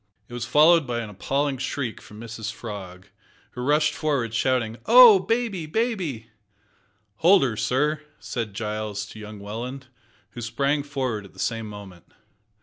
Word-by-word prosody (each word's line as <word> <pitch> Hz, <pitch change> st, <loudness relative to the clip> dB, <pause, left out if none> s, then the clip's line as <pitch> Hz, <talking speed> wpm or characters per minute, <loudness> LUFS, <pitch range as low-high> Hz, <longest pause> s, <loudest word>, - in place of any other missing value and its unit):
It -, -, -13 dB
was 120 Hz, -1 st, -4 dB
followed 155 Hz, +3 st, +5 dB
by 120 Hz, -1 st, -2 dB
an 110 Hz, -2 st, -7 dB
appalling 135 Hz, +6 st, -1 dB
shriek 130 Hz, -3 st, -3 dB
from 105 Hz, -, -13 dB
Mrs 110 Hz, -1 st, -6 dB
Frog, 100 Hz, -4 st, -9 dB, 0.4 s
who 125 Hz, -, -7 dB
rushed 150 Hz, +4 st, +2 dB
forward 135 Hz, -7 st, -1 dB
shouting, 115 Hz, -1 st, 0 dB
"Oh! 235 Hz, -4 st, +9 dB
baby! 215 Hz, -5 st, -1 dB
baby!" 165 Hz, -, -2 dB, 0.9 s
"Hold 185 Hz, -, +5 dB
her, 120 Hz, -5 st, 0 dB
sir," 150 Hz, +7 st, 0 dB, 0.2 s
said 110 Hz, -5 st, -5 dB
Giles 105 Hz, -2 st, -3 dB
to 110 Hz, -, -11 dB
young 105 Hz, 0 st, -9 dB
Welland, 120 Hz, +6 st, -7 dB, 0.4 s
who 120 Hz, -, -8 dB
sprang 140 Hz, +5 st, 0 dB
forward 130 Hz, -7 st, -3 dB
at 100 Hz, -, -15 dB
the -, -, -21 dB
same 115 Hz, -2 st, -2 dB
moment. 100 Hz, -4 st, -11 dB
120 Hz, 150 wpm, -24 LUFS, 110-150 Hz, 0.9 s, Oh